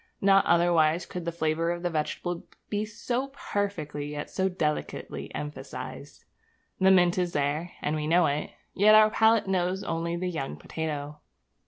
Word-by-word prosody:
Not 195 0 +4
otherwise 170 -1 +3
could 180 -2 -6
the 170 - -1
flavour 165 0 0
of 175 0 -3
the 175 - 0
vegetable 170 +2 -3 0.2
be 210 0 0
so 240 +5 -3
perfectly, 200 - -3
yet 145 - -5
so 190 0 +1
delicately, 155 -5 -3
emphasized. 145 -2 -7 0.5
The 190 - +5
mint 180 -1 +5
is 175 -1 -1
there, 150 +4 -1
and 150 - 0
we 150 -1 -2
know 170 +2 +4
it; 145 0 -1 0.2
yet 210 +2 +6
our 215 0 +7
palate 225 0 +4
knows 185 0 0
only 165 +1 -2
the 180 +1 -2
young 135 - -4
potato.' 150 - -5
170 Hz, 160 wpm, -27 LUFS, 155-190 Hz, 0.5 s, our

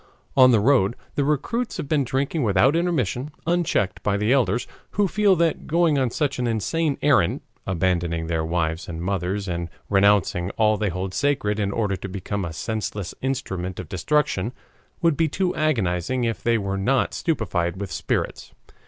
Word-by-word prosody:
On 130 -1 +8
the 115 -3 +5
road 120 -2 +3 0.2
the 145 - 0
recruits 150 - -1
have - - -4
been 145 -1 +2
drinking 135 +5 -1
without 115 - +3
intermission, 150 - 0 0.2
unchecked 165 - 0
by 100 -1 +1
the 105 +5 +2
elders, 125 -2 +2 0.3
who 205 0 +2
feel 205 0 +3
that 165 -2 0
going 165 -3 +3
on 130 -2 +1
such 140 +1 -1
an 125 - 0
insane 140 +7 0
errand, 130 - +3 0.3
abandoning 85 -2 0
their 80 -1 -1
wives 80 0 -1
and 80 -1 -5
mothers 95 +2 -2
and 85 -1 -3 0.2
renouncing 95 -3 +3
all 110 -1 +4
they 105 -1 -1
hold 90 +2 -4
sacred 130 -5 0
in 100 -1 0
order 100 -2 0
to 95 +1 -7
become 100 +1 -3
a 85 - -4
senseless 105 +2 -4
instrument 95 -9 -3
of 90 -4 -7
destruction, 120 - 0 0.5
would 165 -3 +4
be 160 +2 +2
too 180 +4 -1
agonizing 120 - 0
if 115 -1 -1
they 115 -1 +2
were 100 -2 -2
not 130 +6 +1
stupefied 95 - -1
with 100 -3 -5
spirits. - - -3
110 Hz, 170 wpm, -23 LUFS, 95-145 Hz, 0.5 s, On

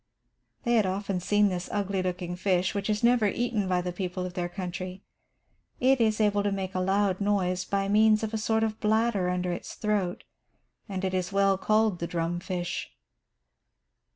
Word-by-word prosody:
They 240 -2 +1
had 220 -4 +4
often 195 0 -2
seen 205 +3 +3
this 180 -1 -4
ugly 200 -2 -1
looking 180 -1 -3
fish, 180 0 +1
which 200 0 -2
is 210 +1 0
never 235 -2 +4
eaten 220 -2 -1
by 180 -1 +2
the 180 0 -3
people 180 0 -3
of 180 - -6
their 175 -1 -2
country. 185 +1 -6 0.8
It 260 0 +3
is 220 -1 +2
able 205 -1 +3
to 205 0 0
make 195 -1 -3
a 185 - -1
loud 195 +1 +1
noise 185 -3 +1
by 195 0 -1
means 215 +1 +4
of 220 0 -3
a - - 0
sort 220 +1 +1
of 220 -1 -2
bladder 215 -3 +1
under 180 0 -1
its 175 - -6
throat, 205 -4 -1 0.7
and 190 -1 -3
it 190 - -1
is 185 0 -1
well 195 0 +3
called 215 -1 +2
the 170 - -2
"drum 170 0 -2
fish." 180 -1 -4
195 Hz, 185 wpm, -28 LUFS, 180-210 Hz, 0.8 s, had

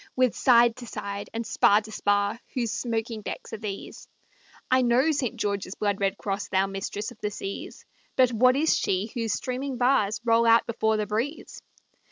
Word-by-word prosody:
With 255 -3 +3
side 240 -2 +4
to 245 -1 -9
side, 200 -2 -6
and 230 +1 -4
spar 205 0 +4
to 215 0 -11
spar, 205 +2 0 0.2
Whose 235 -4 -1
smoking 225 -1 -3
decks 210 - -7
are 220 - -5
these? 205 -2 -7 0.6
I 260 0 +5
know 250 +5 +3
St. 275 -6 -1
George's 200 -2 -3
blood 205 -2 -1
red 195 -1 0
cross, 200 0 -3
Thou 190 0 +2
mistress 195 +3 -5
of 230 - -15
the 210 - -1
seas, 195 -1 -7 0.3
But 255 -1 +4
what 255 +3 +4
is 310 +3 +3
she 195 +4 -1
whose 230 -3 -1
streaming 255 +1 -3
bars 240 -4 +2
Roll 230 0 +4
out 230 0 +5
before 220 -1 0
the 210 - -1
breeze? 230 +9 -4
225 Hz, 185 wpm, -26 LUFS, 205-245 Hz, 0.6 s, I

